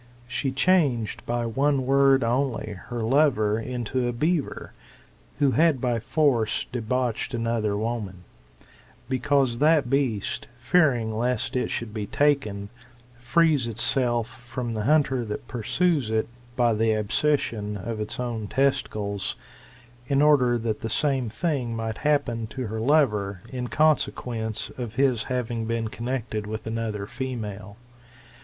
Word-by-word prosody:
She 130 +2 -2
changed 135 - +2
by 120 0 0
one 135 +3 +1
word 135 0 +4
only 120 -2 0 0.2
her 120 -2 -3
lover 115 -5 +3
into 125 +1 -2
a - - 0
beaver, 150 +5 -1 0.6
who 140 -3 +3
had 155 -1 +3
by 120 -2 0
force 120 -2 +1
debauched 125 +1 -1
another 115 -3 0
woman; 105 -5 -3 0.8
because 130 -2 +1
that 150 -4 +3
beast, 130 -8 0
fearing 120 -7 +2
lest 125 +2 -1
it 125 - 0
should 115 -3 -4
be 105 -2 -4
taken, 110 -8 +1 0.5
frees 145 0 +3
itself 120 0 0
from 120 -1 -4
the 105 -1 -2
hunter 135 -4 +3
that 105 +1 -6
pursues 140 - 0
it, 110 0 0 0.3
by 120 -2 +3
the 110 0 +2
abscission 105 -2 0
of 110 +3 -5
its 105 - -4 0.3
testicles; 105 -7 0 0.7
in 140 +1 +2
order 140 -5 +4
that 110 -2 -2
the 115 - -3
same 135 -1 +1
thing 125 -2 -2
might 110 -1 -3
happen 140 -7 0
to 130 +3 -5
her 110 +1 -4
lover, 105 - +2
in 125 -1 -4
consequence 120 -7 0
of 120 -3 -5
his 130 -4 +2
having 120 -3 -2
been 115 -1 -1
connected 115 -3 -3
with 110 +1 -5
another 110 -2 -3
female. 105 -5 -6
120 Hz, 130 wpm, -25 LUFS, 110-135 Hz, 0.8 s, word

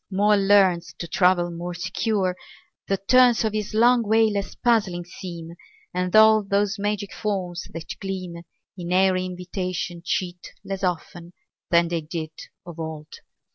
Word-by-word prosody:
Mole 205 +1 +3
learns 190 -4 +4
To 170 - -5
travel 180 -1 +2
more 175 +1 -5
secure; 185 +1 -1 0.5
the 195 - +1
turns 245 +4 +4
Of 215 - -1
his 215 -1 -3
long 240 +2 +5
way 220 0 +3
less 200 -1 -3
puzzling 200 -8 +1
seem 170 -3 -8 0.4
And 180 +1 -1
all 220 0 +7
those 200 +1 0
magic 205 -1 -2
forms 185 -5 -3
that 165 0 -7
gleam 185 -3 -5 0.4
In 175 -2 -6
airy 185 0 +3
invitation 180 -1 -4
cheat 175 0 -3
Less 195 -1 -5
often 175 -1 -3 0.4
than 170 -1 +3
they 170 -1 -1
did 160 0 -5 0.3
of 170 -2 -10
old. 160 -1 -7
185 Hz, 145 wpm, -24 LUFS, 175-205 Hz, 0.5 s, all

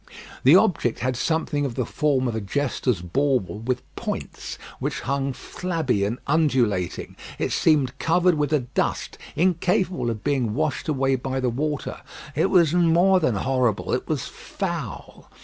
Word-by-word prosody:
The - - +8
object - - +3
had 130 +1 0
something 155 +1 0
of 130 -4 -2
the 125 - -1
form 135 -1 +1
of 120 - -1
a 110 - -2
jester's 125 -3 -1
bauble 125 +1 0
with 125 +2 -2
points, - - -5 0.2
which - - -2
hung 140 +1 -1
flabby 145 - -2
and 110 +4 -2
undulating. 130 - +1 0.2
It - - -1
seemed 140 -5 +2
covered 180 +2 +3
with 150 -2 0
a 150 -3 +3
dust 125 +1 -2 0.2
incapable 180 - +1
of 110 -3 -4
being 125 -7 0
washed 155 +1 -1
away 135 -3 +1
by 130 +1 -3
the 125 -2 0
water. 150 +3 -3 0.3
It 160 +6 +2
was 170 -5 +4
more 175 +2 +4
than 140 -10 +1
horrible; 125 -1 0
it 125 - -1
was 150 -6 -1
foul. 170 - -6
135 Hz, 155 wpm, -24 LUFS, 125-160 Hz, 0.3 s, The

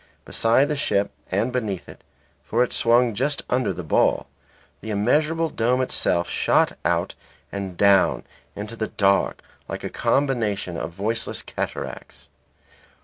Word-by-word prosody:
Beside 115 +5 +3
the 150 - -1
ship 100 -8 0 0.2
and 110 +7 0
beneath 105 -7 -2
it - - -13 0.4
(for 120 +3 +1
it 125 - -3
swung 120 0 +4
just 140 +7 -1
under 125 -5 +1
the 90 -1 -6
ball), 75 - +2 0.5
the 110 - -8
immeasurable 155 +10 +1
dome 120 +3 +1
itself 90 -8 +1
shot - - +2
out - - 0 0.4
and 95 -3 -5
down 100 -1 +4 0.3
into 105 +2 -6
the 110 -1 -2
dark 100 -1 +1 0.2
like - - -6
a - - -4
combination 110 -10 0
of 80 - -3
voiceless 105 +6 -2
cataracts. - - -6
110 Hz, 140 wpm, -23 LUFS, 100-125 Hz, 0.5 s, swung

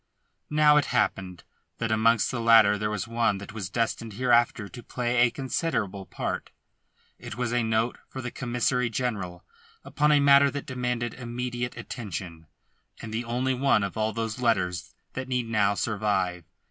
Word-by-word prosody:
Now 150 0 +5
it 150 - +3
happened 95 -4 -1 0.3
that 115 -1 -2
amongst 110 0 +3
the 120 -3 -3
latter 115 -3 +6
there 105 +1 -2
was 105 -4 -3
one 115 -3 +1
that 100 +1 -9
was 100 -5 -5
destined 115 +1 -2
hereafter 120 -2 +2
to 120 - -10
play 125 0 -2
a 120 0 +5
considerable 115 - -2
part; - - -4 0.7
it - - -8
was 120 -1 -1
a 120 - +2
note 110 +1 0
for 130 - -7
the 125 -2 -5
Commissary 125 0 0
General 100 -8 -3 0.4
upon 150 +1 +1
a 145 - +5
matter 140 0 +6
that 145 0 -5
demanded 125 -2 -2
immediate 120 0 -4
attention, 90 -8 -7 0.5
and 110 -1 -7
the 115 +2 -2
only 125 +3 0
one 130 -5 +2
of 100 - -4
all 110 0 0
those 115 +2 -3
letters 90 -7 0 0.2
that 130 0 -5
need 125 -2 -1
now 105 -3 +2
survive. 100 -6 -1
115 Hz, 165 wpm, -27 LUFS, 105-125 Hz, 0.7 s, latter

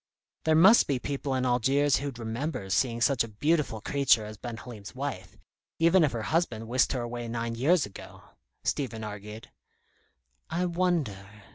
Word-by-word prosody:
"There 160 0 +4
must 195 +9 +7
be 140 - +1
people 140 +1 -3
in 130 0 0
Algiers 135 +4 +2
who'd 140 -3 -5
remember 115 -2 -4
seeing 120 +2 +1
such 130 0 +3
a - - -6
beautiful 115 0 0
creature 135 -4 +2
as 105 0 -8
Ben 115 +2 -7
Halim's 110 -4 -10
wife, 125 -10 -5 0.4
even 170 +2 +5
if 150 - +2
her 115 -2 -4
husband 120 -9 -1
whisked 125 +2 +2
her 130 - -2
away 120 0 -5
nine 115 0 -3
years 145 +8 +2
ago," 100 - -12 0.4
Stephen 115 -6 -2
argued. 105 +1 -8 1.0
"I 175 +2 -1
wonder?" 135 - -2
125 Hz, 160 wpm, -28 LUFS, 110-145 Hz, 1.0 s, must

